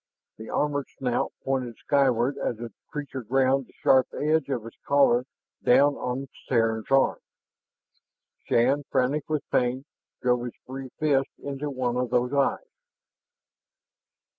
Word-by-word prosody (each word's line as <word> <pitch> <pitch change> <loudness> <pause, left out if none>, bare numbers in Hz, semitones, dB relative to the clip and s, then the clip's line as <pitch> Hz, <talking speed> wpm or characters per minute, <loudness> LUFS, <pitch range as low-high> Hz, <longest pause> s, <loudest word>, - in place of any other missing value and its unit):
The 110 - -9
armored 145 -2 0
snout 125 -2 -1
pointed 130 -4 -2
skyward 135 -2 +2
as 120 - -2
the 115 -2 -7 0.2
creature 140 -3 -5
ground 130 +3 +2
the - - -23
sharp 130 -1 +5
edge 155 -1 +1
of 120 -5 -2
its 115 - -11
collar 130 -3 +3 0.4
down 140 +4 +5
on 125 0 -3
the 135 - -8 0.2
Terran's 115 -3 +1
arm. 135 0 +3 1.3
Shann, 130 +5 +3
frantic 135 +3 0
with 155 -3 -2
pain, 125 +2 +1 0.3
drove 125 -1 +1
his 120 - -6
free 130 0 -7
fist 140 -3 +2
into 140 +1 -4
one 125 -3 -1
of 125 -1 0
those 125 +2 +1
eyes. 140 - 0
130 Hz, 140 wpm, -26 LUFS, 125-140 Hz, 1.3 s, sharp